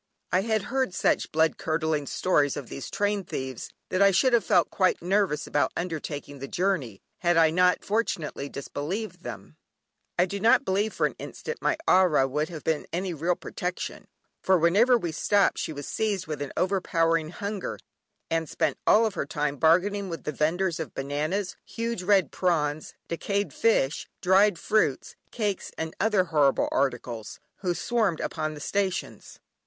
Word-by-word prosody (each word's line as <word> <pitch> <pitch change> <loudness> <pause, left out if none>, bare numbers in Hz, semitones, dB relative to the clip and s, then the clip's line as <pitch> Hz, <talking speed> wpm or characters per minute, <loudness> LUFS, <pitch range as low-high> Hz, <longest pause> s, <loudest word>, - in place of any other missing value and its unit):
I 185 - +3
had 220 0 0
heard 260 -8 0
such - - +1
blood 160 0 +2
curdling 155 -2 -1
stories 150 -7 +1
of 140 -5 -7
these 135 - -6
train 205 -1 0
thieves 130 -7 -5 0.2
that 185 - 0
I 200 - +7
should 195 +7 +3
have 235 -3 +4
felt 175 -2 +3
quite 185 -2 +2
nervous 185 -3 +1
about 145 - +1
undertaking 150 -4 -5
the 135 - -6
journey, 160 - -1 0.2
had 175 -1 +2
I 160 -1 +5
not 180 +2 +3
fortunately 180 -10 -2
disbelieved 160 +11 -5
them. - - -9 0.6
I 180 - +4
do 200 +2 -5
not 225 +3 +5 0.3
for - - 0
an - - -1
instant 470 0 -6
believe - - -51
my 320 - +1 0.3
ayah 150 -5 +3
would 150 +4 -1
have 160 -3 -8
been 160 -2 -1
any 180 +1 -2
real 170 +3 0
protection, 180 +1 -5 0.3
for 190 -1 +4
whenever 205 +10 +4
we 175 -7 -3
stopped 200 +5 +2
she - - -3
was 145 -2 -6
seized 205 -4 -1
with 150 -3 -5
an 145 - -4
overpowering 165 -4 +1
hunger, 200 +2 -4 0.5
and 165 -2 -1
spent - - -1
all 220 0 +5
her 160 - -3
time 145 -1 -2
bargaining 185 +6 +3
with 165 - -6
the - - -2
vendors 165 +4 0
of 160 - -6
bananas, 155 +8 -2
huge 230 -3 -4
red 195 0 +3
prawns, 155 -4 -1
decayed 200 +4 -2
fish, 165 -11 +1
dried 190 +1 +4
fruits, 170 -8 0
cakes, 210 -5 -2
and 160 0 -4
other 210 -3 +3
horrible 150 -6 +2
articles, 120 -4 -2 0.2
who 180 -3 -1
swarmed 215 -8 0
upon 155 -1 -3
the - - -9
stations. 190 +4 -3
175 Hz, 165 wpm, -27 LUFS, 150-200 Hz, 0.6 s, I